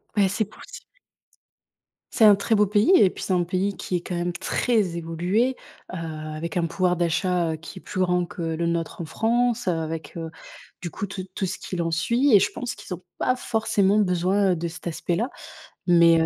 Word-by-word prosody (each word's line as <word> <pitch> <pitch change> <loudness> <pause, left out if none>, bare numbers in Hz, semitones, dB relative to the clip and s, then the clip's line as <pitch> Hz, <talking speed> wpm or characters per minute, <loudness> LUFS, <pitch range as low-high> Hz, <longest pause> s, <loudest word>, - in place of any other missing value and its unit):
Beh, 200 -2 +4
c'est 215 +3 0
possible. 220 - -13 1.2
C'est 225 - +5
un 210 -1 +9
très 200 +3 +1
beau 210 -1 +4
pays 210 - +3
et 195 - +6
puis, - - -8
c'est - - -3
un 180 -1 +2
pays 190 +3 -1
qui 185 - -3
est 175 - 0
quand 180 - -5
même 175 0 -1
très 195 0 0
évolué, 175 +10 0 0.4
heu, - - -3
avec 155 0 -5
un 170 - +2
pouvoir 180 +1 +1
d'achat, 170 0 +1
heu, - - -3
qui 160 +2 -10
est - - -19
plus 185 - -3
grand 180 -1 +2
que 175 - -8
le 165 0 -1
nôtre 170 -1 -2
en 170 - -3
France, 235 +3 +1
avec 160 -2 -3
heu, 165 -1 -4 0.5
du 175 - -5
coup, 200 - -4
tout 190 -1 -6
tout 195 - -1
ce 185 - -3
qu'il 180 -2 -4
en 165 - 0
suit 235 - +2
et - - +9
je - - +1
pense 245 0 -5
qu'ils - - -7
ont 180 0 -8
pas 255 0 +1
forcément 215 -4 +1
besoin, 190 +1 +2
heu, - - +2
de 170 +1 -2
cet 170 +1 -8
aspect-là, 175 +7 -1 0.6
mais 170 -2 +6
heu, 160 - +3
180 Hz, 215 wpm, -24 LUFS, 170-205 Hz, 1.2 s, un